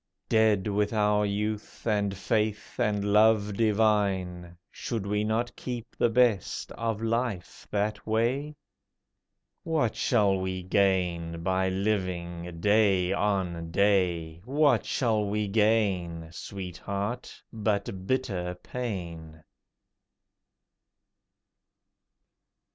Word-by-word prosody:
Dead 110 -3 +3
with 105 +1 0
our 105 -1 +2
youth, 105 +1 -3
and 100 -3 0
faith, 105 +2 -1
and 105 -3 +1
love 105 -1 +4
divine, 100 -5 +1
Should 115 -5 -4
we 105 +1 0
not 110 +3 -1
keep 120 -3 -6
the 120 - +2
best 115 -5 +1
of 115 -1 -3
life 115 -5 -2
that 105 +1 -2
way? 125 +7 0 1.1
What 155 -9 0
shall 100 -5 +2
we 95 -1 -3
gain 90 -3 +1
by 95 +1 +1
living 90 -4 -2
day 100 -3 +3
on 95 -5 -1
day? 85 -4 +1
What 145 +5 +2
shall 110 -4 +1
we 105 +1 -1
gain, 95 -6 +1
Sweetheart, 100 +6 -5
but 100 -3 -2
bitter 95 -9 -1
pain? 85 -8 -6
100 Hz, 95 wpm, -28 LUFS, 95-110 Hz, 1.1 s, love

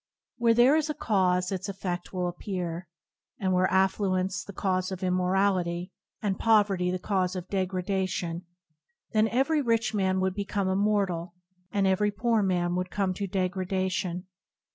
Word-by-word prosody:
Where 230 -1 +4
there 250 +5 +6
is 315 -1 +1
a 300 - -2
cause 185 -3 +1
its 190 +1 -3
effedt 180 -2 -4
will 180 -1 -1
appear, 175 -1 -4 0.5
and 190 -1 0
were 185 +1 +3
affluence 190 -1 +1
the - - -9
cause 185 -1 -1
of 190 0 -5
immorality, 180 -1 +1 0.3
and 195 -2 -1
pov 220 -2 +4
erty 180 -2 0
the 185 - -1
cause 185 -1 -1
of 180 0 -5
degradation, 185 -2 -2 0.6
then 215 -1 +3
every 270 +7 +2
rich 230 -3 +1
man 190 -2 +1
would 190 0 +1
become 200 0 -2
immoral 190 -3 0 0.4
and 200 -1 +1
every 190 +2 +3
poor 225 +2 +1
man 175 -3 +1
would 180 0 -2
come 195 -2 0
to 200 +2 -3
degradation. 185 -1 -1
190 Hz, 155 wpm, -28 LUFS, 180-205 Hz, 0.6 s, there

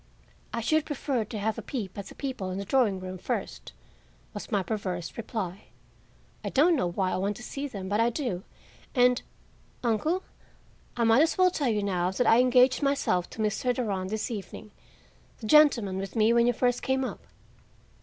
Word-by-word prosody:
"I 230 - -2
should 310 +6 +2
prefer 270 -5 -1
to 215 - -6
have 215 +2 -1
a - - -5
peep 210 -9 -5
at 200 -1 -6
the - - -12
people 260 -9 -4
in 185 - -4
the 200 - -4
drawing 215 -5 +2
room 185 0 -7
first," - - -4 0.6
was 205 - -7
my 200 -2 +1
perverse 185 -3 -4
reply. 205 -5 -5 0.8
"I - - -2
don't 325 +5 +4
know 180 - +1
why 185 +1 -1
I - - 0
want 200 +2 -1
to 245 - -10
see 280 +3 -4
them, 195 -7 -6
but 205 +2 0
I 230 +1 +4
do; 240 -7 -3 0.5
and, 250 -1 +4 0.6
uncle, 305 - 0 0.7
I 235 - +2
might 225 +4 +5
as 325 - +2
well 370 -1 +5
tell 285 -7 0
you 210 -2 0
now 180 -3 0
that 190 +7 0
I 225 - +6
engaged 255 +1 +4
myself 275 -11 +1
to 220 - -4
Mr. 230 +4 0
Durand 195 -7 -2
this 220 +3 -3
evening—the 215 +2 -11
gentleman 230 -8 +5
with 195 -1 -6
me 220 +1 +4
when 235 0 +4
you 245 - +3
first 245 +1 +1
came 265 0 0
up." - - -6
225 Hz, 190 wpm, -28 LUFS, 195-255 Hz, 0.8 s, I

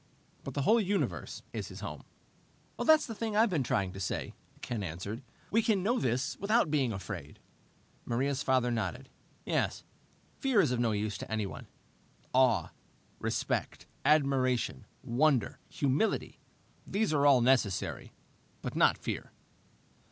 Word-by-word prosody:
But - - -7
the 140 - 0
whole 225 +10 +5
universe 200 0 -2
is - - -4
his - - -9
home." - - -6 0.8
"That's 315 -1 +6
the 230 - -6
thing 220 -1 -3
I've 220 -1 +4
been 160 -5 +1
trying 115 -8 0
to 95 - -8
say," 95 - -3 0.3
Ken 115 -3 -3
answered. 95 +6 -5 0.3
"We 225 - +4
can 215 -5 +1
know 240 +5 +2
this 125 +1 -1
without 215 -3 +2
being 135 -6 +2
afraid." 95 -5 -6 0.7
Maria's 135 +3 0
father 130 -3 +2
nodded. 125 +3 -3 0.4
"Yes. - - 0 0.6
Fear 265 -7 +4
is 150 -8 +1
of 125 - 0
no 120 -2 +2
use 105 -1 -2
to - - -7
anyone. 110 -3 -3 0.7
Awe, 130 -3 +3 0.5
respect, - - -2 0.2
admiration, 135 - +2 0.2
wonder, 130 0 +2
humility 140 +10 0 0.5
these 200 -4 0
are 145 -1 +4
all 135 -3 +6
necessary. 120 -6 +1 0.5
But - - -4
not - - +4
fear." - - -5
130 Hz, 140 wpm, -31 LUFS, 115-190 Hz, 0.8 s, That's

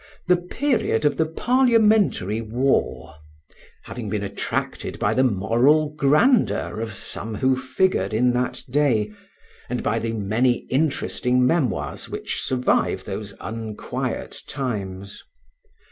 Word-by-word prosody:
the 180 0 +4
period 210 - 0
of 145 - +2
the 160 - +2
Parliamentary 220 - +3
War, 115 - -1 0.7
having 115 -4 -6
been 105 -1 -2
attracted 100 0 -3
by - - +1
the 130 - +3
moral 125 +8 +3
grandeur 150 - +2
of 110 -2 -4
some 110 +2 -5
who 130 +4 +2
figured 130 +8 0
in 125 +3 +3
that 125 +1 -2
day, 120 -6 +1 0.6
and - - -2
by - - +1
the 115 0 -3
many 115 +4 +1
interesting 130 -3 +1
memoirs 130 - -1
which - - -4
survive 125 -1 +1
those 100 -2 -6
unquiet 110 -1 -5
times. 100 -7 -5
125 Hz, 115 wpm, -23 LUFS, 110-150 Hz, 0.7 s, the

